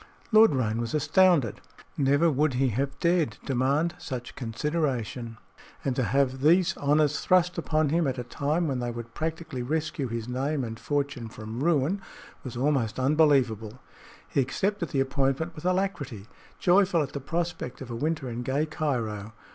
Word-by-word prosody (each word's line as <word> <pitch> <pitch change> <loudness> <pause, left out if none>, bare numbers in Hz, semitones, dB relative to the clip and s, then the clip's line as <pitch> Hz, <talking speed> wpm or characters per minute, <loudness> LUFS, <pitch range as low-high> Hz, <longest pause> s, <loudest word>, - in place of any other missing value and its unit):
Lord 220 -6 +7
Roane 115 -3 0
was 115 +4 -3
astounded. 170 - +3 0.3
Never 145 +4 +3
would 145 -1 +1
he 130 +1 +2
have 135 +5 -2
dared 170 -3 +1
demand 140 +6 +1
such 125 -3 -6
consideration, 125 -2 -2 0.5
and 135 -2 0
to 130 - +1
have 130 +1 +1
these 175 +5 +4
honors 145 +1 +2
thrust 180 -1 +3
upon 155 -2 +1
him 165 0 +2
at 130 -1 -2
a 125 - -3
time 150 +7 -1
when 135 -3 -1
they 120 0 -2
would 115 -1 -7
practically 160 -4 -4
rescue 150 +1 -2
his 115 -1 -4
name 135 +3 -1
and 115 -1 -6
fortune 140 -5 -2
from 110 +4 -6
ruin 170 +4 +2 0.4
was 125 -2 -6
almost 130 -4 0
unbelievable. 130 -6 +2 0.5
He - - -1
accepted 190 +6 -1
the 135 - +1
appointment 135 +4 0
with 155 - -10
alacrity, 180 - -1 0.3
joyful 180 -2 +4
at 140 - -7
the 140 - -3
prospect 165 -3 -3
of 130 -3 -8
a - - -3
winter 150 +1 -1
in 120 0 -4
gay 135 +5 0
Cairo. 115 -9 -3
140 Hz, 165 wpm, -27 LUFS, 125-160 Hz, 0.5 s, Lord